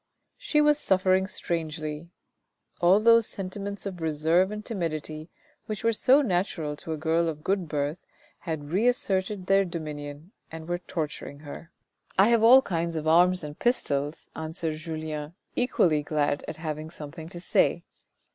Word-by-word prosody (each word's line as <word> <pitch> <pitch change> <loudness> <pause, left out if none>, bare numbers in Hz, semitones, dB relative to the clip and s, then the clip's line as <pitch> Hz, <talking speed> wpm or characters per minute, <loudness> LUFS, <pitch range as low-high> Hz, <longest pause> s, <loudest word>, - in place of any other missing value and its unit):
She 300 - +2
was 295 0 +4
suffering 190 -2 +2
strangely; 160 -3 -4 0.7
all 180 +4 +6
those 230 0 +5
sentiments 200 +1 -6
of 185 -4 -5
reserve 160 +4 +2
and 210 0 -6
timidity 155 -5 -4 0.4
which 215 0 -4
were 230 0 +3
so 265 +6 +5
natural 175 - -1
to 160 - -7
a - - -4
girl 165 +2 +1
of 150 -1 -7
good 190 -3 0
birth, 150 +2 -2 0.4
had 155 -3 -5
reasserted 195 -2 +1
their 195 +1 +4
dominion 150 -2 -7 0.2
and 160 0 -8
were 175 0 -1
torturing 150 -4 -5
her. 155 +2 -9 0.2
" - - -32
I 195 +4 +6
have 235 -2 +4
all 255 +4 +8
kinds 170 -4 -2
of 155 0 -3
arms 180 +2 +5
and 150 0 -8
pistols," 145 - 0
answered 160 0 -3
Julien 155 -1 -5 0.2
equally 175 - +2
glad 145 -1 0
at 155 - -5
having 155 -1 -5
something 160 0 -9
to 175 - -8
say. 175 - +2
170 Hz, 155 wpm, -27 LUFS, 155-195 Hz, 0.7 s, all